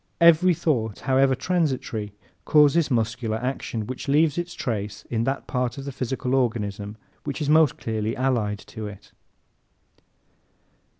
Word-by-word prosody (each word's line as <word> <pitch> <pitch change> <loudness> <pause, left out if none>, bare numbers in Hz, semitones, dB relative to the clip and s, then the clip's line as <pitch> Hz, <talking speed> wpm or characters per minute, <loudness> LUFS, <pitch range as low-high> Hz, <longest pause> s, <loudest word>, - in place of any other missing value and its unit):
Every 170 +1 +6
thought, 125 - -1
however 135 0 +3
transitory, 130 - -1 0.3
causes 150 - +4
muscular 115 -2 0
action, 120 -3 -3
which 130 +5 -6
leaves 150 +1 +3
its 175 0 -4
trace 105 -3 -4
in 115 -1 0
that 135 +2 -2
part 125 -1 -2
of 135 - -6
the 140 - -4
physical 130 0 -3
organism 105 -5 -1 0.3
which 140 - -4
is 150 -2 -1
most 155 -3 +5
closely 110 0 -2
allied 120 -6 0 0.2
to 110 -2 -5
it. 105 0 -11
125 Hz, 135 wpm, -24 LUFS, 110-145 Hz, 0.3 s, Every